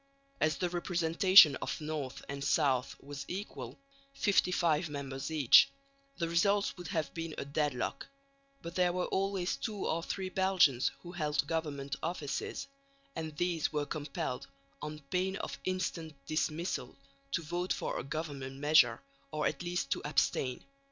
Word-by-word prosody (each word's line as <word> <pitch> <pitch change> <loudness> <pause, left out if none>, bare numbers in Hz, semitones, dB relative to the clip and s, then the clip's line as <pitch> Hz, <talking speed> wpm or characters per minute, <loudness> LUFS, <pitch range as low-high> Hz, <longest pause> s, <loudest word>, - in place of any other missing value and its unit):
As 155 0 +2
the 180 - 0
representation 175 -2 +6
of - - -4
north 150 -4 -4
and 140 0 -5
south 135 -6 +2
was 140 0 -7
equal, 200 +3 -6 0.4
55 175 -5 +2
members 140 -1 -4
each, 150 -6 +7 0.5
the 170 - -1
result 200 +5 +2
would 175 -1 -8
have 160 -5 -2
been 165 -1 -5
a - - -3
deadlock, 140 -3 -1 0.6
but 170 - -6
there 180 -1 +3
were 180 0 0
always 195 -2 0
two 210 -3 -4
or 165 - 0
three 190 +2 -3
Belgians 185 -10 +3
who 175 - -8
held 150 -5 0
government 140 -3 -2
offices; 160 -4 -3 0.5
and 155 -2 -5
these 175 -3 0
were 150 -2 -1
compelled, 145 -2 -4 0.3
on 150 0 -5
pain 185 +1 +1
of - - -5
instant 180 -4 -2
dismissal, 155 -3 -2 0.4
to 170 - 0
vote 175 +4 -2
for - - -1
a - - -4
government 140 -2 -5
measure 140 -5 +5 0.3
or 155 -1 -2
at 140 - 0
least 175 -5 -2
to - - +1
abstain. 135 -3 0
160 Hz, 145 wpm, -32 LUFS, 145-180 Hz, 0.6 s, each